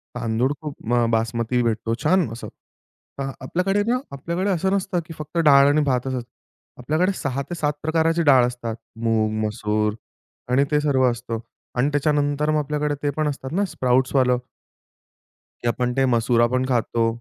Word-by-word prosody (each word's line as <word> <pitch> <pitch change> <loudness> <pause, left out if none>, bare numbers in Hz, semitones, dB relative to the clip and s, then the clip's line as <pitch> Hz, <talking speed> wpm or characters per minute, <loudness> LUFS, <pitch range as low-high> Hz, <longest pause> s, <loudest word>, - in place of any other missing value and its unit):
तांदूळ 120 +2 0
खूप 140 -6 -5
अ, 120 -1 +3
बासमती 115 +2 0
भेटतो, 115 0 -1
छान 180 -2 +3
असं. 115 - -7 0.7
तर 135 0 -2
आपल्याकडे 190 +9 0
ना, 245 - +2
आपल्याकडे 170 +8 -2
असं 190 +1 0
नसतं, 195 -2 -1
की 165 - -9
फक्त 155 +2 -7
डाळ 140 -1 +7
आणि 150 +1 +3
भात 130 -2 0
असतं. 130 -1 -2 0.6
आपल्याकडे 155 +9 +1
6-7 145 +2 -2
प्रकाराची 165 +1 +2
डाळ 135 -5 +6
असतात. 120 -2 -5 0.3
मूग, 110 -1 +2
मसूर 105 0 -1 0.6
आणि 130 +2 +4
ते 150 - +3
सर्व 130 -4 +3
असतं. 120 -1 -5 0.4
आणि 125 +3 +2
त्याच्यानंतर 145 0 +1
मग 155 - +2
आपल्याकडे 150 0 -1
ते 145 - +2
पण 155 -1 +1
असतात 135 -2 -4
ना, 200 +5 +1
स्प्राउट्सवालं 130 -4 +2 1.3
की - - -1
आपण 125 +1 0
ते 135 - +4
मसुर 120 0 +3
पण 130 +1 0
खातो. 115 -1 +1
135 Hz, 155 wpm, -23 LUFS, 120-155 Hz, 1.3 s, डाळ